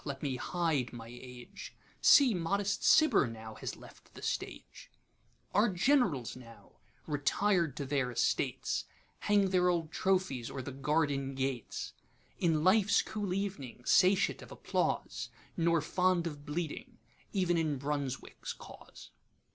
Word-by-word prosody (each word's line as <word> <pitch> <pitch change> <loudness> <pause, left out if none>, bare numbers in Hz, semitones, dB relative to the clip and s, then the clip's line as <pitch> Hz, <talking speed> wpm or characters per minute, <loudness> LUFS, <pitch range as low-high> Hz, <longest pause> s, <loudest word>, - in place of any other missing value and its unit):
let 140 -1 -6
me 135 -3 -1
hide 155 -3 -1
my 115 -1 -9
Age:See 125 - +1
modest 195 +3 -1
Cibber 285 - +5
now 110 -1 -8
has - - -6
left - - -16
the - - -10
Stage:Our 210 +4 -4
gen'rals 185 - +2
now, 115 -2 -15 0.3
retired 160 +2 +1
to 140 - -3
their 135 -2 0
estates, 120 - 0 0.3
Hang 200 -2 +2
their 180 -1 +3
old 165 -3 -1
trophies 185 -12 0
o'er 130 - -5
the 140 - -6
garden 140 -1 0
gates; 130 -3 -3 0.5
In 160 -3 +2
life's 200 +3 +4
cool 205 -3 -4
ev'ning 180 -11 -4
satiate 190 +1 +4
of - - -12
applause, - - -2 0.3
Nor 170 -1 +2
fond 180 +2 +1
of 145 -3 -6
bleeding 175 - -4 0.4
ev'n 180 -3 +2
in 155 -4 0
BRUNSWICK'S 140 -1 -4
cause. - - -13
160 Hz, 125 wpm, -32 LUFS, 135-190 Hz, 0.5 s, Cibber